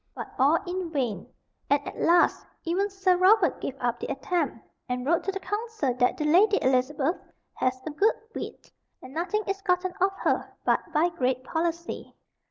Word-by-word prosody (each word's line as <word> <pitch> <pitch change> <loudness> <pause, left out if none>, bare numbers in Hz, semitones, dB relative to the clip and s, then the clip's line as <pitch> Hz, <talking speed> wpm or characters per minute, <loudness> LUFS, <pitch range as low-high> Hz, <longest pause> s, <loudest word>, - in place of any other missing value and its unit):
But - - -7
all 285 +5 +5
in 360 -1 -3
vain; 255 -9 -2 0.4
and 285 - +4
at - - -7
last 345 +1 +4 0.2
even 375 +4 0
Sir 385 -2 +2
Robert 380 +1 +4
gave 275 - -4
up 240 -1 -1
the - - -4
attempt, 305 0 -1 0.3
and 250 0 -2
wrote 335 +4 +2
to 390 - 0
the 390 - -4
council 415 - -2
that 250 0 +1
"the 300 - -2
Lady 395 +7 +5
Elizabeth 270 +5 +1 0.4
hath 255 0 -1
a 315 - -3
good 400 +9 +3 0.2
wit, - - -7 0.3
and 255 - -10
nothing 370 +7 -1
is 390 0 -3
gotten 360 -2 0
of 385 +1 +4
her - - 0
but - - +4
by 325 +2 +3
great 255 -6 -1
policy." 335 +3 -3
335 Hz, 180 wpm, -27 LUFS, 270-375 Hz, 0.4 s, all